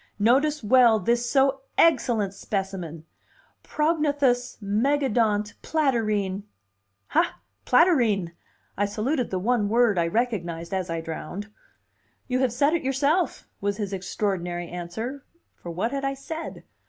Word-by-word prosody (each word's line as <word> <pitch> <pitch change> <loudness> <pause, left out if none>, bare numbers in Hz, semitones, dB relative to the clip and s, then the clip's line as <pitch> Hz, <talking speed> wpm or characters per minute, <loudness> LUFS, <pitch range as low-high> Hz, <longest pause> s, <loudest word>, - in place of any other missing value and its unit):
Notice 270 +7 +2
well 235 0 +6
this 235 +4 0
so 270 0 +3 0.2
egcellent 230 -11 +3
specimen. 190 -6 -4 0.6
Prognathous, 290 -6 +1
megadont, 215 -1 +1
platyrrhine." 215 -10 0 0.7
"Ha! - - +1 0.3
Platyrrhine!" 240 - +3 0.4
I 205 - +1
saluted 245 +6 -1
the 190 - -2
one 210 +1 +1
word 230 -4 +3
I 170 - +2
recognized 175 -6 -2
as 185 -2 -2
I 165 0 -2
drowned. 180 +6 -6 0.8
"You 255 0 0
have 260 -2 +2
said 280 +6 +2
it 340 - +1
yourself!" 285 +6 0
was 200 0 -1
his 205 -3 -3
extraordinary 185 -2 -2
answer; 220 +11 -5 0.3
for 175 - -10
what 185 +8 -2
had 275 0 -3
I 275 0 -1
said? 320 +4 -7
225 Hz, 125 wpm, -25 LUFS, 195-270 Hz, 0.8 s, well